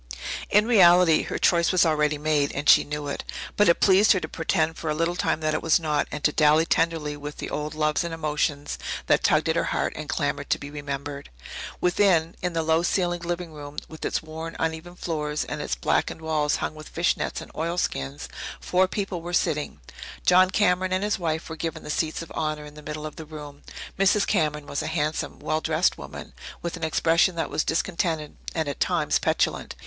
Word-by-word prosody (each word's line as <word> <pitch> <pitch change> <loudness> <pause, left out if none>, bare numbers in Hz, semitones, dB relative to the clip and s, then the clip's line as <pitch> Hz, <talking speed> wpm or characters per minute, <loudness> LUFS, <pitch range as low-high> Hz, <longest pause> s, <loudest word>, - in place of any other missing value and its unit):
In 210 +1 +4
reality, 180 -7 +6
her - - -4
choice 170 -1 +3
was 180 -1 +4
already 150 -2 +2
made, 150 -1 +1
and 145 +1 -3
she - - +8
knew 150 0 -5
it. 140 - -4 0.3
But 205 -3 +4
it 170 - +4
pleased 200 +3 +6
her 190 - +1
to - - -4
pretend 160 0 0
for 160 - -4
a 150 - 0
little 165 +2 0
time 160 - 0
that 155 0 0
it - - -1
was 165 0 +3
not, 155 -3 0
and 150 - -5
to 150 - +4
dally 155 +1 +4
tenderly 160 -3 0
with 145 0 -7
the - - -6
old 150 +1 -3
loves 155 +1 +1
and 170 - -4
emotions 150 -2 -2 0.3
that - - +3
tugged - - +3
at - - +1
her - - +1
heart - - -1
and - - -7
clamoured - - -1
to - - +2
be 140 - -9
remembered. 140 -1 -5 0.5
Within, 175 -3 +3
in 180 -1 -1
the 165 -1 0
low 160 +1 +3
ceilinged 175 -1 0
living 175 -1 -3
room, 145 -1 -9
with 160 - -11
its - - -1
worn, 160 +1 -7
uneven 160 +2 -3
floor 150 -4 -3
and - - -4
its - - -2
blackened - - 0
walls 155 -2 +1
hung - - -3
with 155 0 -11
fish 170 +1 +1
nets - - -3
and - - -10
oilskins, 155 - -2 0.3
four 185 +1 +2
people 195 -2 -3
were 175 +1 -6
sitting. 150 -3 0 0.4
John 185 +1 +6
Cameron 185 -2 +2
and 185 +1 0
his 210 -1 0
wife 160 -2 -2
were 160 - -6
given 160 0 -4
the - - -4
seats 160 +1 -1
of 165 - -13
honour 155 -1 -2
in 150 - -11
the 150 - -11
middle 150 0 -6
of 155 - -7
the 160 - -7
room. 150 -2 -10 0.4
Mrs. 195 +1 +4
Cameron 150 -2 0
was 140 - -3
a - - -4
handsome, 155 -1 -2
well 155 - -1
dressed 160 +3 +2
woman, - - -9 0.3
with 170 0 -3
an 170 - -8
expression 165 +3 +3
that 165 - -2
was - - +1
discontented 165 -2 -1 0.2
and, 160 -2 0
at 140 - -4
times, - - +1
petulant. - - 0
160 Hz, 215 wpm, -25 LUFS, 150-175 Hz, 0.5 s, she